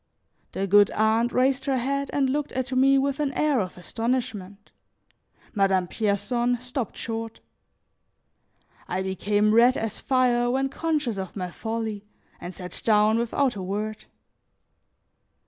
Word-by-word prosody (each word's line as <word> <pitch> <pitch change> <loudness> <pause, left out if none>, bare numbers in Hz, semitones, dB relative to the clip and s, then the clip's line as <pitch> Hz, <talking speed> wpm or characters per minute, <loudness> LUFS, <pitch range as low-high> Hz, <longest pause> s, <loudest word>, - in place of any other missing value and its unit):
The 195 - -1
good 205 +1 +5
aunt 220 +2 +2
raised 265 +1 +1
her 270 -2 +1
head 275 +3 -1
and 280 -2 +1
looked 290 +2 -1
at 260 0 -3
me 270 +1 +4
with 275 +1 0
an 290 -2 0
air 295 -3 +2
of 185 -3 -4
astonishment; 215 -1 -4 0.8
Madame 195 -3 +2
Pierson 235 +5 0
stopped 250 -1 -5
short. 225 0 -5 1.5
I 185 +1 -2
became 205 +3 +1
red 240 +3 +5
as 225 -1 -3
fire 245 -2 +2
when 270 +2 0
conscious 285 -8 -2
of 190 -1 -6
my 180 -3 -4
folly, 220 -1 -4 0.4
and 175 - -7
sat 180 -1 -7
down 215 0 +4
without 245 +2 0
a 195 - -5
word. 210 +3 -4
230 Hz, 135 wpm, -25 LUFS, 205-260 Hz, 1.5 s, good